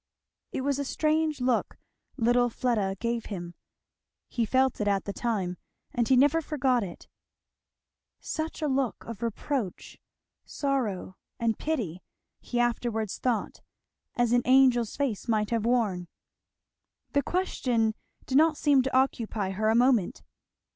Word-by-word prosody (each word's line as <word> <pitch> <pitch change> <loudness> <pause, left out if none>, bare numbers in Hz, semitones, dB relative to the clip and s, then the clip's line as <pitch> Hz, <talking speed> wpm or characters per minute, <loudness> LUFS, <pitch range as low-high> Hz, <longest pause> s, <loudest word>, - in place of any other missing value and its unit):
It - - -3
was 280 +1 0
a - - 0
strange 310 0 0
look 250 -2 0 0.4
little 245 +1 +3
Fleda 220 -6 0
gave 235 -1 -2
him. 175 -4 -6 0.8
He 230 -3 -1
felt 260 0 +2
it 210 - 0
at 200 -1 +1
the 200 - -4
time, 195 -7 -2 0.4
and 235 -2 +1
he 260 - +5
never 290 +5 +4
forgot 260 -6 +1
it. 175 -3 -9 1.1
Such 315 0 -4
a - - +2
look 265 -3 -1
of 230 -3 -8
reproach, 230 -2 -3 0.4
sorrow, 235 -10 -2 0.2
and 230 -2 0
pity, 215 - -2 0.4
he 240 - -3
afterwards 235 -3 -1
thought, 240 -4 -1 0.5
as 240 -2 +2
an 245 0 +4
angel's 255 -3 +4
face 260 -8 -2
might 215 -2 +1
have 230 -2 0
worn. 210 -8 +1 1.0
The 285 - +2
question 250 -11 0 0.3
did 265 +2 +3
not 315 -1 +4
seem 285 -3 +4
to 260 0 0
occupy 225 -6 0
her 215 +3 0
a 220 - +3
moment. 240 -3 +2
240 Hz, 140 wpm, -28 LUFS, 215-265 Hz, 1.1 s, he